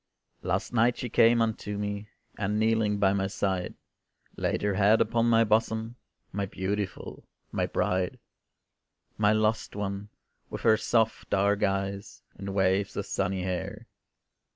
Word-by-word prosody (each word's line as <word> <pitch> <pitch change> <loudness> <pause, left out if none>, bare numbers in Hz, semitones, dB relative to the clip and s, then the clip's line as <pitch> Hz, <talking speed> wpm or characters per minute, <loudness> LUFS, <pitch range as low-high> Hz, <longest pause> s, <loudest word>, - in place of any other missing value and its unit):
Last - - -2
night 120 +1 +3
she 125 - -4
came 115 +1 +5
unto 105 -2 -3
me, 100 0 -3 0.3
And 105 +1 -1
kneeling 110 -1 +2
by 100 -1 +3
my 95 -1 0
side, 95 -2 -2 0.6
Laid - - -1
her 105 -1 +1
head 105 +3 +4
upon 115 0 +2
my 115 0 +5
bosom, 110 +1 0 0.4
My 100 0 -2
beautiful, 95 +1 -4 0.2
my - - 0
bride; 90 -1 0 1.0
My 105 -1 +4
lost 110 0 +1
one, 100 0 -4 0.4
with - - -6
her 110 -1 +5
soft 110 0 0
dark 100 +1 +2
eyes, 100 0 -2
And 100 0 -6
waves 95 0 +1
of - - -2
sunny 95 -1 -1
hair. 90 -1 -4
105 Hz, 140 wpm, -28 LUFS, 100-110 Hz, 1.0 s, came